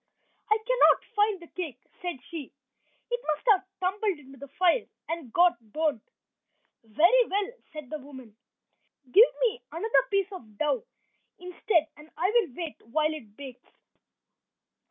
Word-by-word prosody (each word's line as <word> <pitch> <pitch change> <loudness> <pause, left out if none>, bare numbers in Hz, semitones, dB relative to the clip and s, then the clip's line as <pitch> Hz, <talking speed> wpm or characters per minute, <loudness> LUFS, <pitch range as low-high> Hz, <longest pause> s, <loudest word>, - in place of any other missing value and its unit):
"I 430 - +5
cannot - - +4
find 415 -1 +2
the 340 - -12
cake," 325 -8 -6 0.2
said 355 -7 -4
she. 315 -6 -6 0.6
"It 485 - 0
must 305 +5 -1
have 385 -2 +4 0.2
tumbled 385 0 0
into 270 -2 -15
the 280 - -9
fire 360 - +2 0.2
and 325 -7 -5
got 345 -5 +4
burnt." 305 -6 0 0.8
"Very 345 - +4
well," 405 +3 -1 0.2
said 300 -4 -9
the 310 - -2
old 275 - -15
woman, 260 -7 -12 0.8
"give 440 - +8
me 480 -1 +1
another 435 +8 +2
piece 395 -1 +1
of 220 - -11
dough 305 - 0 0.5
instead 360 -2 0
and 300 +1 -15
I 365 +5 +1
will 430 - +1
wait 330 -4 -6
while 310 +6 +1
it 220 -9 -11
bakes." 265 -3 -11
335 Hz, 150 wpm, -28 LUFS, 285-405 Hz, 0.8 s, give